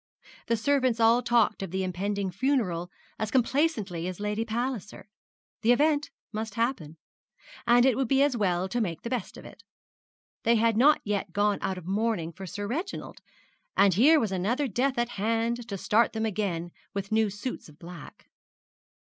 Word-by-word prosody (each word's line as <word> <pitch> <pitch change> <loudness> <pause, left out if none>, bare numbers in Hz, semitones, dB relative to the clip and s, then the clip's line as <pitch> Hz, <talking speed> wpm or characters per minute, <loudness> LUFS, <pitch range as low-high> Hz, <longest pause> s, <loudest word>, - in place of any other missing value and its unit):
The 230 - +1
servants 255 0 +1
all 230 +2 +5
talked 235 -3 +2
of 195 - -4
the 190 +2 -2
impending 195 +1 -2
funeral 185 -6 0 0.3
as 215 - -1
complacently 235 - 0
as 185 0 -5
Lady 210 +2 -1
Palliser. 230 -3 -4 0.5
The 230 +2 +4
event 295 +2 +2 0.2
must 215 -1 -4
happen; 230 - -2 0.7
and 240 +1 +6
it 265 -3 +4
would 265 0 0
be 270 +3 +4
as 285 -3 +2
well 185 -4 0
to 240 +5 -1
make 170 -7 -3
the 235 - -5
best 245 -7 -3
of - - -11
it. - - -13 0.8
They 235 - +3
had 225 0 +3
not 290 +7 +5
yet 200 -3 -2
gone 205 0 +1
out 190 -1 -2
of 180 - -9
mourning 195 -4 -1
for 190 +1 -8
Sir 205 +3 -5
Reginald; 320 - -5 0.6
and 200 -1 +5
here 290 - +6
was 220 -7 -1
another 220 +10 0
death 255 +4 0
at 240 0 0
hand 230 +2 0
to 200 -4 -4
start 220 +5 +2
them 220 0 -1
again 185 -5 -2 0.2
with 200 0 -4
new 220 -1 +3
suits 205 -1 -6
of 150 - -17
black. 170 -2 -11
220 Hz, 175 wpm, -27 LUFS, 190-240 Hz, 0.8 s, and